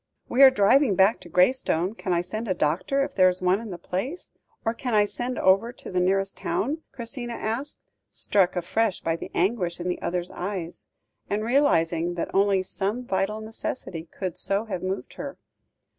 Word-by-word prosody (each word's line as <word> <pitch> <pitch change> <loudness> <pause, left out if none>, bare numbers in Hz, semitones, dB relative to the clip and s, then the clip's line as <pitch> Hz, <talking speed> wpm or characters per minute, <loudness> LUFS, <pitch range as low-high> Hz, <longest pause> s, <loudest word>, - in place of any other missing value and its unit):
"We 255 - +2
are 270 - +11
driving 255 0 +4
back 195 +4 +4
to 175 - -13
Graystone. 180 -1 +2
Can 195 -4 -4
I 170 -1 +2
send 215 +6 -5
a 185 - 0
doctor 175 - +1
if 275 0 -4
there 185 -4 +5
is 180 0 -2
one 185 +3 +2
in 230 - -7
the 180 - -6
place? 230 - -5 0.3
Or, 225 - +1
can 240 -1 -2
I 210 -1 +5
send 245 +4 -4
over 195 +5 +3
to - - -10
the 180 - +1
nearest 195 +2 +1
town?" 285 +9 -1
Christina 240 -1 -5
asked, 230 +6 -4 0.3
struck 190 -3 +2
afresh 205 +3 0
by 165 0 0
the - - -7
anguish 180 -2 0
in 175 - -4
the 180 - -2
other's 175 0 -2
eyes, 180 -2 -5 0.4
and 205 +1 -1
realising 175 - +2
that 170 - -4
only 195 -1 +3
some 205 +6 -3
vital 205 +1 -1
necessity 215 -6 -5
could 185 -4 -4
so 200 +3 0
have 195 -5 -4
moved 190 +1 -4
her. - - -6
195 Hz, 190 wpm, -25 LUFS, 180-230 Hz, 0.4 s, are